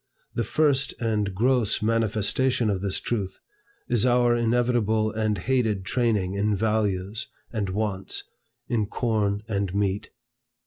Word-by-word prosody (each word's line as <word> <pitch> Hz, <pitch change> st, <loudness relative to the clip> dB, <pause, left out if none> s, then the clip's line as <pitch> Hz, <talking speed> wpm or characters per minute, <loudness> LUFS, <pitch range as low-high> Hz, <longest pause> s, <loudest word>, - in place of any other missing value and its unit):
The 120 Hz, -, 0 dB
first 140 Hz, +3 st, +1 dB
and 105 Hz, -3 st, 0 dB
gross 120 Hz, -1 st, +2 dB
manifestation 115 Hz, +2 st, +1 dB
of 95 Hz, -2 st, -2 dB
this 100 Hz, -1 st, 0 dB
truth, 100 Hz, -5 st, -3 dB, 0.5 s
is 120 Hz, -4 st, +2 dB
our 120 Hz, -1 st, +4 dB
inevitable 115 Hz, -2 st, +1 dB
and 110 Hz, -1 st, 0 dB
hated 110 Hz, -2 st, 0 dB
training 105 Hz, -7 st, +1 dB
in 105 Hz, +1 st, +1 dB
values 105 Hz, 0 st, -1 dB, 0.3 s
and 105 Hz, -4 st, -1 dB
wants, 100 Hz, -1 st, -2 dB, 0.4 s
in 110 Hz, -4 st, 0 dB
corn 105 Hz, -3 st, 0 dB
and 100 Hz, -3 st, -2 dB
meat. 100 Hz, -1 st, 0 dB
110 Hz, 125 wpm, -25 LUFS, 100-120 Hz, 0.5 s, our